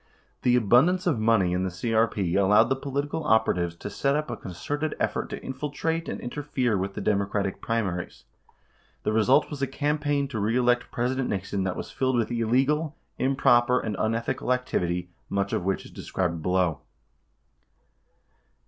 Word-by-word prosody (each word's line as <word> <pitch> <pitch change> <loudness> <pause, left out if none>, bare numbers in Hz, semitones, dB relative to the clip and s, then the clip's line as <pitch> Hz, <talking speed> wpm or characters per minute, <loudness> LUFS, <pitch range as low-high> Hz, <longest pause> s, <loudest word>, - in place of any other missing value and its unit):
The 125 0 +4
abun 120 - +5
dance 185 0 -1
of 155 -10 +1
money 110 -5 +3
in 90 +1 0
the 95 - 0
CEP 110 +5 0 0.2
allowed 105 +4 +5
the 135 - +2
political 140 +3 -3
operatives 90 - +2
to 95 - -7
set 140 +7 +1
up 150 +1 -2
a - - -2
concerted 145 - -4
effort - - -1
to - - -6
infiltrate 150 +5 -3
and - - -4
interfere 125 -3 -1
with 95 +1 -2
the - - -4
Democratic 100 -1 0
primaries. 95 -6 -2 0.8
The 105 - 0
result 125 +8 +3
was 145 -2 -6
a 135 - +1
campaign 145 +1 0
to 115 -5 -3
reelect 120 +3 +2
President 125 +2 -1
Nixon 95 0 -2
that 95 - -1
was - - -6
filled 130 -1 0
with 115 -1 0
illegal, 135 +7 +1 0.2
improper, 125 -2 +3
and 110 -2 -3
unethical 115 +3 -1
activity, 90 -8 -1 0.2
much 100 0 -1
of 90 - -1
which 95 0 -1
is - - -12
described 85 -3 -3
below. 90 -4 +1
120 Hz, 160 wpm, -26 LUFS, 100-135 Hz, 0.8 s, abun